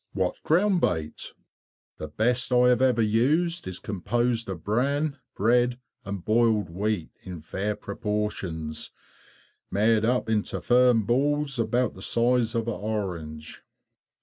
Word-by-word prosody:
What 95 -2 -1
ground 180 +3 +2
bait_? 80 -2 -2 0.6
The 80 - -6
best 120 - 0
I 125 0 +5
have 125 +1 +3
ever 125 -3 +3
used 145 - +1
is 95 -1 -5
composed 115 +3 -1
of 90 -4 -6
bran, 140 +6 0 0.2
bread, 120 +3 +2 0.2
and 100 -2 -6
boiled 110 -5 +2
wheat, 100 -1 -2
in 90 -2 -8
fair 95 +7 -3
proportions, 100 -7 -3 0.8
made 110 +2 +2
up 125 +1 +1
into 110 -2 -1
firm 125 -2 +4
balls 140 +3 +1
about 120 +1 +1
the 95 - -12
size 120 +1 +1
of 115 0 -1
an 115 - 0
orange. 90 -9 -5
110 Hz, 130 wpm, -26 LUFS, 100-125 Hz, 0.8 s, I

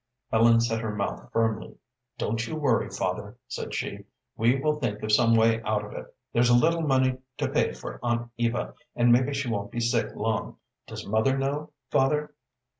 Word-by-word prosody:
Ellen 115 +1 +5
set 115 -1 0
her 110 -2 -3
mouth 100 -1 -3
firmly. 115 -1 0 0.4
"Don't 115 +2 -1
you 160 - -4
worry, 140 -7 +1
father," 100 +5 -3
said - - -5
she. - - -4 0.3
"We 120 +4 +3
will 150 +1 0
think 105 -6 -2
of 110 - -1
some 115 +1 +5
way 115 0 +4
out 105 -1 -1
of 105 - -10
it. - - -8 0.2
There's 120 +1 +4
a 120 - +6
little 165 +7 +3
money 130 -4 +2 0.2
to - - 0
pay - - +1
for - - -8
Aunt 120 0 -1
Eva, 120 0 -1 0.2
and 120 0 +4
maybe 125 +3 +4
she 140 -2 -2
won't 105 -3 -2
be 120 - -3
sick 115 0 0
long. 110 0 -2 0.3
Does - - -7
mother 110 +6 +2
know, 145 +3 -2 0.2
father?" 150 +2 +2
120 Hz, 190 wpm, -27 LUFS, 110-135 Hz, 0.4 s, a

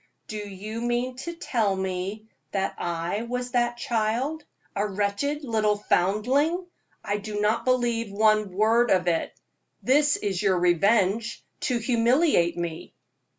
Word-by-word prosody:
"Do 215 - -5
you 210 +2 -6
mean 240 +1 -1
to 340 +6 -6
tell 230 - 0
me 190 +3 -3 0.3
that 195 -1 0
I 170 +4 -2
was 245 +1 -4
that 240 -1 +1
child? 240 +7 -1 0.3
A 200 - +1
wretched 205 +10 -1
little 215 -4 +1
foundling! 255 - +1 0.4
I 205 - 0
do 210 0 -5
not 210 +2 +1
believe 240 -4 +1
one 215 0 +3
word 225 +5 +3
of 185 -1 +3
it. 165 -2 +1 0.5
This 290 +3 +4
is 195 -4 -2
your 195 -3 +2
revenge 195 +5 +2 0.2
to 250 - 0
humiliate 235 - +2
me." 170 -2 -5
215 Hz, 135 wpm, -26 LUFS, 195-245 Hz, 0.5 s, This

